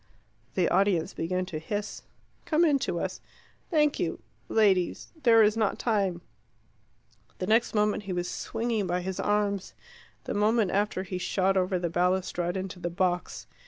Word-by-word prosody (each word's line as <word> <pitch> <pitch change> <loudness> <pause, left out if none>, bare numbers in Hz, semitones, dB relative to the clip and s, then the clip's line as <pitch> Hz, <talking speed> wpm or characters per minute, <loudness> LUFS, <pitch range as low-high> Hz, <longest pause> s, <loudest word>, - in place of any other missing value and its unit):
The 180 -3 +2
audience 190 -3 +2
began 185 +2 -2
to 165 -4 -5
hiss. 205 +6 -4 0.4
"Come 320 +2 +3
in 290 -4 +3
to - - -2
us." - - -4 0.5
"Thank 300 -4 +2
you - - -2 0.3
ladies 195 -5 +2
there 225 -3 +6
is 210 +1 +3
not 220 -3 0
time 195 -6 0 0.6
" - - -36
The 185 - -3
next 225 +3 +2
moment 210 0 +2
he - - -1
was 175 0 -2
swinging 225 -2 -2
by 180 +1 0
his 190 +1 -4
arms. 205 -2 0 0.5
The - - -4
moment 210 -1 +2
after 200 -1 0
he 185 -1 -5
shot 190 +1 +1
over 185 0 +1
the 175 -1 -1
balustrade 180 0 0
into 185 -1 -5
the 175 - -3
box. 180 0 -1
195 Hz, 160 wpm, -28 LUFS, 180-215 Hz, 0.6 s, there